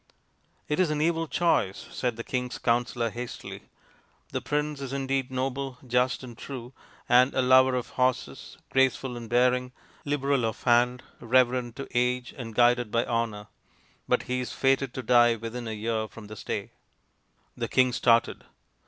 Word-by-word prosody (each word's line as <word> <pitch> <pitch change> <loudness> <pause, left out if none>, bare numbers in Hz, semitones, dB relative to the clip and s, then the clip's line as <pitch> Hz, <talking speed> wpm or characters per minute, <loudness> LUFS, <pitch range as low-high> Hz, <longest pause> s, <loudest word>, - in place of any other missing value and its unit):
" - - -41
It 150 - -1
is 185 -4 +3
an 150 -1 -1
evil 165 +1 +1
choice," 150 - 0
said 125 -3 -2
the 115 - -6
king's 125 0 -3
counsellor 120 -1 0
hastily. 120 +1 -8 0.3
" - - -37
The - - -2
prince 150 -1 -2
is 135 -1 -5
indeed 135 -1 -1
noble, 130 0 -3
just, 125 +1 +1
and 120 -2 -9
true, 125 0 -8 0.3
and 125 +2 +5
a 130 - +3
lover 130 0 +5
of 125 -2 -3
horses, 130 -1 -2
graceful 130 -1 +1
in 120 -1 -7
bearing, 125 +2 +2 0.3
liberal 140 -2 0
of 110 -1 -3
hand, 120 +1 +3 0.2
reverent 125 0 +2
to 135 - -6
age, 125 0 0
and 115 -4 -8
guided 120 -1 +4
by 115 +2 +1
honour. 115 -3 -2 0.6
But - - +2
he 125 0 -2
is 125 -2 -4
fated 135 -1 +1
to 130 - -4
die 120 0 +5
within 115 +1 -6
a - - -3
year 110 0 -2
from 110 0 -12
this 105 0 -9
day" - - -4 0.8
The - - -3
king 130 -1 +3
started. 115 -1 +2
125 Hz, 170 wpm, -27 LUFS, 120-130 Hz, 0.8 s, and